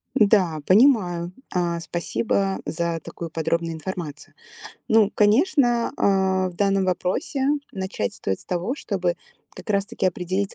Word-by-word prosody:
Да, 200 -9 +3
понимаю. 185 -6 +4 0.2
А, 175 -2 0
спасибо 190 +3 -1
за 170 0 -2
такую 165 -1 -7
подробную 165 +1 -1
информацию. 160 -3 -7 0.5
Ну, 220 -2 +4
конечно, 240 - +3
а, 190 -1 +2
в - - -15
данном 195 0 +1
вопросе 185 - -1 0.3
начать 190 - -3
стоит 95 - -3
с - - -16
того, 180 +8 -2
чтобы 185 -10 -2 0.4
как - - -9
раз 200 -1 +1
таки 230 -3 -4
определить 185 +2 -2
190 Hz, 130 wpm, -23 LUFS, 170-210 Hz, 0.5 s, понимаю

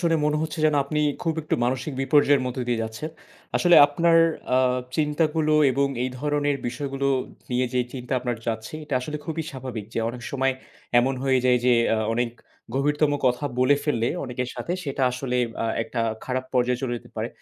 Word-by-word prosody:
শুনে 170 -2 +2
মনে 150 0 +1
হচ্ছে 160 +1 -4
যেন 150 - +2
আপনি 150 +2 -2 0.2
খুব 165 -2 0
একটু - - -1
মানসিক 130 +4 -1
বিপর্যয়ের 145 0 +4
মধ্য 125 +1 -4
দিয়ে 120 -2 +1
যাচ্ছেন। 110 +8 -5 0.5
আসলে 175 -1 +5
আপনার 165 +3 +3 0.4
আ - - +5 0.4
চিন্তাগুলো 155 0 +1 0.2
এবং 140 +2 +2 0.2
এই 130 - -1
ধরনের 145 0 0
বিষয়গুলো 135 +2 -3 0.4
নিয়ে 125 +1 +1
যেই 125 -1 +1
চিন্তা 125 0 -6
আপনার 120 -1 -2
যাচ্ছে, 110 +4 -3
এটা 145 - -3
আসলে 150 +4 -4
খুবই 160 0 -2
স্বাভাবিক 125 -6 -6
যে - - -1
অনেক 120 +1 -7
সময় 135 -1 +1 0.5
এমন 130 +2 +2
হয়ে 135 -1 +3
যায় 125 -1 +5
যে 125 - +5 0.2
আ - - 0 0.2
অনেক 120 0 0 0.4
গভীরতম 145 +2 +2 0.2
কথা 125 +3 +1
বলে 135 +3 +4
ফেললে 120 -6 +1 0.2
অনেকের 125 0 -3
সাথে 175 - -4
সেটা 140 -1 -2
আসলে 125 -1 -2 0.3
আ - - 0 0.2
একটা 115 - -4 0.2
খারাপ 130 0 -2
পর্যায়ে 125 0 +2
চলে 125 -2 -1
যেতে - - -12
পারে। - - -2
135 Hz, 185 wpm, -24 LUFS, 125-150 Hz, 0.5 s, আসলে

